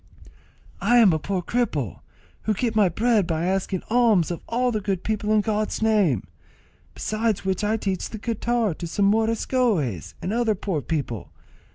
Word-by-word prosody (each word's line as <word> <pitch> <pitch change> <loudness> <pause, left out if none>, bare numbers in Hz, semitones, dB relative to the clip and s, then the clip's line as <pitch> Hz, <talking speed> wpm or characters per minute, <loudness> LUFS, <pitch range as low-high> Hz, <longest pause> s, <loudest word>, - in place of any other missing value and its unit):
"I 245 - +4
am 215 -7 +6
a 155 - 0
poor 185 +4 -2
cripple, 160 - -1 0.5
who 215 - +1
get 230 +1 -1
my 205 -4 +4
bread 220 +1 +2
by 165 -1 -1
asking 190 0 -1
alms 225 -8 +3
of 170 - -5
all 245 +2 +1
good 205 -4 -2
people 215 -1 -1
in 215 -1 +4
God's 215 0 -1
name; 205 - +3 0.7
besides 215 -2 -1
which 190 +1 -1
I 215 +2 +1
teach 195 -4 -2
the 220 - -6
guitar 230 -1 0
to 170 - -6
some 200 +4 0
moriscoes, 215 - +1
and 190 - -3
other 230 -2 +1
poor 180 -5 -2
people. 130 - -3
210 Hz, 165 wpm, -24 LUFS, 175-225 Hz, 0.7 s, am